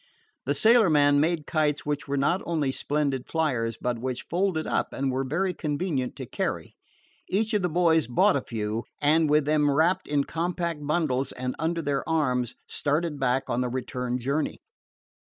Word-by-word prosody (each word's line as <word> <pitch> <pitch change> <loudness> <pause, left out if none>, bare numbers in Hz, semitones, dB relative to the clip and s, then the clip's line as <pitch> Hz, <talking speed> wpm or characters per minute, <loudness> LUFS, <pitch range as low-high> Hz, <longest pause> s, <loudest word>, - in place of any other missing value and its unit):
The - - +1
sailorman 155 -12 +5
made 160 0 +1
kites 150 -2 0
which 145 -1 -2
were 140 0 -1
not 150 +7 +1
only 155 -5 0
splendid 140 -2 -1
fliers 125 -9 -1
but 125 -1 -2
which 125 0 -3
folded 175 -2 0
up - - -1
and 135 0 -1
were 130 +1 -1
very 180 +8 -1
convenient 150 -4 -2
to - - -6
carry. - - -3 0.5
Each 220 +4 0
of 210 - +2
the 180 - 0
boys 160 -4 +3
bought 120 +3 +3
a 140 - +1
few, 110 -1 -3
and, 155 +2 +3
with 150 -1 +3
them 150 -1 +3
wrapped 160 +6 +2
in 145 -1 +1
compact 170 -1 -3
bundles 150 -5 0
and 125 0 -4
under 165 +1 -1
their 140 -1 -1
arms, 125 -7 0
started 150 +1 -1
back 135 0 +1
on 120 +1 0
the 125 - -1
return 125 0 -3
journey. 140 +5 -1
145 Hz, 170 wpm, -26 LUFS, 130-165 Hz, 0.5 s, sailorman